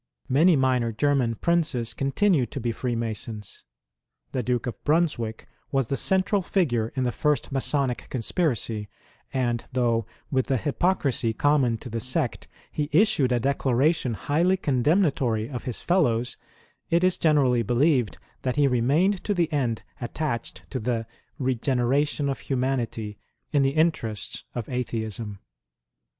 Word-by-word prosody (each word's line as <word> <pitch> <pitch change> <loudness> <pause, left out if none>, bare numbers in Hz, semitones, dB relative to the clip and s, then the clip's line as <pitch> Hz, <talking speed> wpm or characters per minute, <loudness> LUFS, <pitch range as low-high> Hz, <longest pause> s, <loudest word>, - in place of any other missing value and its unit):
Many 160 +7 +5
minor 130 -4 +2
German 125 0 +1
Princes 155 -8 0
continued 140 - +1
to - - -3
be 120 -1 -1
Freemasons. 115 -3 -4 0.7
The 130 - -1
Duke 125 0 -1
of 120 - -6
Brunswick 145 -9 0 0.2
was 135 -4 +1
the 135 - +1
central 190 +5 +2
figure 125 - 0
in 130 - 0
the 125 - +1
first 150 0 0
Masonic 135 -1 -1
conspiracy, 115 - -1 0.4
and 120 -3 0
though, 115 -3 +1 0.2
with 130 -2 +1
the 135 - +2
hypocrisy 140 -4 0
common 135 -2 +2
to 120 - -9
the 115 - -2
sect, 130 +2 -1 0.2
he 150 -1 -2
issued 155 - +3
a 120 - +2
declaration 135 +1 +1
highly 170 - +1
condemnatory 135 - +1
of 125 -1 -6
his 125 -4 -4
fellows, 125 -10 +1 0.5
it 170 +2 +3
is 185 -1 +4
generally 140 -7 +3
believed 125 +1 +2 0.2
that 125 -1 -1
he 145 -1 +4
remained 145 - +2
to 205 - 0
the 170 -3 0
end 125 -6 0 0.2
attached 120 -1 -3
to 130 - -2
the 115 0 -1 0.2
" - - -41
regeneration 135 +3 +1
of 135 - -2
humanity 125 -5 -2 0.2
" - - -50
in 145 - +4
the 135 +1 +1
interests 155 - 0
of 120 -3 -3
Atheism. 110 -4 -3
130 Hz, 140 wpm, -25 LUFS, 115-150 Hz, 0.7 s, Many